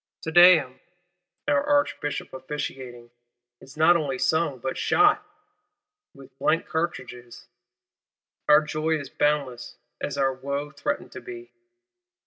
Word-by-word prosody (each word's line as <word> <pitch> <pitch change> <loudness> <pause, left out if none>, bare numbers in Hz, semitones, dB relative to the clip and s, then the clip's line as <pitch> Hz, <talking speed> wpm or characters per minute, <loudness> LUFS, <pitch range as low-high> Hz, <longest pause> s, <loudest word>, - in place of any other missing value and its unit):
Te 160 - -4
Deum, 160 -7 +6 0.7
our 285 -1 +2
Archbishop 290 - -1
officiating, 130 -3 -7 0.5
is 135 +3 -15
not 160 +3 +5
only 145 -6 -1
sung, 160 -1 0
but 130 +2 -4
shot—with 310 - -2
blank 165 +2 +1
cartridges. 125 -7 -5 1.0
Our 150 +1 +7
joy 155 +1 -1
is 140 -3 -9
boundless 145 -5 -1 0.3
as - - -4
our 135 -1 +1
wo 140 +2 -5
threatened 290 - -4
to - - -9
be. 360 -1 -10
150 Hz, 110 wpm, -25 LUFS, 130-175 Hz, 1.0 s, Our